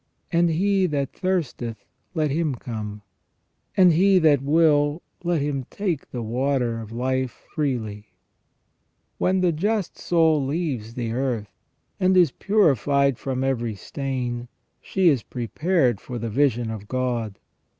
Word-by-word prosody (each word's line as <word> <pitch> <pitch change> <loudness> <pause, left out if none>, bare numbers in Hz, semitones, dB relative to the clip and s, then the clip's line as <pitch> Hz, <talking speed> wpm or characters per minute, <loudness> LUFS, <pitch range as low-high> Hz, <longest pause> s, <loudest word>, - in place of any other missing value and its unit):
And 170 0 +3
he 190 +3 +2
that 140 -4 -2
thirsteth, 140 - -2 0.3
let 155 -3 +1
him 155 -2 0
come. 105 -4 -6 0.7
And 180 -3 +7
he 190 +4 +5
that 155 -6 +4
will, 145 +1 +3 0.2
let 170 -4 +1
him 140 -3 -2
take 180 -8 -3
the 120 -2 -4
water 120 0 0
of 110 -1 -9
life 130 +1 -2
freely," 110 -8 -2 1.1
When 185 0 +2
the 180 -1 +3
just 200 +4 -1
soul 160 -4 +3
leaves 135 -7 -3
the 120 -2 -2
earth, 120 -4 -2 0.5
and 185 0 +3
is 175 -6 +5
purified 140 - +2
from 130 -1 -2
every 120 -5 -1
stain, 125 0 -4 0.3
she 190 -2 +1
is 140 -7 +4
prepared 125 - 0
for 125 - -6
the 115 0 -3
vision 120 -2 +1
of 105 -2 -7
God. 120 -5 -2
135 Hz, 135 wpm, -24 LUFS, 120-165 Hz, 1.1 s, And